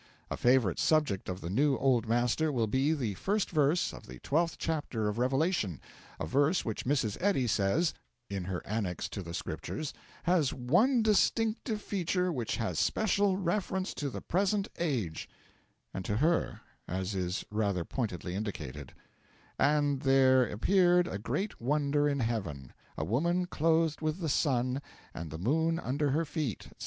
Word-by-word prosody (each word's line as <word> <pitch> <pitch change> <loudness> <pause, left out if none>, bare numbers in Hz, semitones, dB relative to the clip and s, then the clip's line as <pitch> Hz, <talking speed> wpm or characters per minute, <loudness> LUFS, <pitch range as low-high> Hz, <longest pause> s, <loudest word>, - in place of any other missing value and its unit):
A - - 0
favourite 120 -8 +3
subject 150 -14 +1
of 90 0 -4
the 85 - -5
new 140 +6 +3
Old 125 -4 +2
Master 120 +7 +2
will 120 -5 +1
be 130 +7 +1
the 125 -10 -1
first 200 - -1
verse 155 +1 +2
of - - -11
the 65 +1 -9
twelfth 165 +3 0
chapter 145 -9 -2
of 105 +2 -2
Revelation 130 - +1 0.4
a - - -2
verse 145 - +2
which 110 -3 -3
Mrs. 125 -6 0
Eddy 185 -10 +2
says 115 - +1 0.3
(in 100 -3 -4
her 90 -1 -4
Annex 100 -4 -2
to 100 - -5
the 85 -1 -6
Scriptures) 155 -2 -4 0.3
has 170 -5 +2
'one 210 - +3
distinctive 220 +1 +1
feature 180 -1 0
which 120 -6 -2
has 115 -2 -2
special 200 -2 +2
reference 190 0 -1
to 145 - -3
the - - -6
present 195 +2 +1
age' 120 - -2 0.6
and 95 - -4
to 105 - -1
her, 165 +7 +1 0.3
as 95 +2 -2
is 90 0 -2
rather 100 -5 0
pointedly 95 -8 -3
indicated: 85 - -5 0.7
'And 145 -2 +2
there 130 -1 +5
appeared 180 - +3
a 100 - -4
great 145 - -3
wonder 145 +2 +2
in 140 -2 -1
heaven 95 - -3 0.2
a 80 - -1
woman 170 - +1
clothed 160 -2 +1
with 155 +1 -1
the 165 -4 -2
sun 130 -2 +1 0.3
and 80 -1 -6
the 80 - -6
moon 160 - +1
under 145 -1 -1
her 160 +5 +1
feet,' 150 - -3
etc. - - -19
135 Hz, 160 wpm, -31 LUFS, 105-165 Hz, 0.7 s, there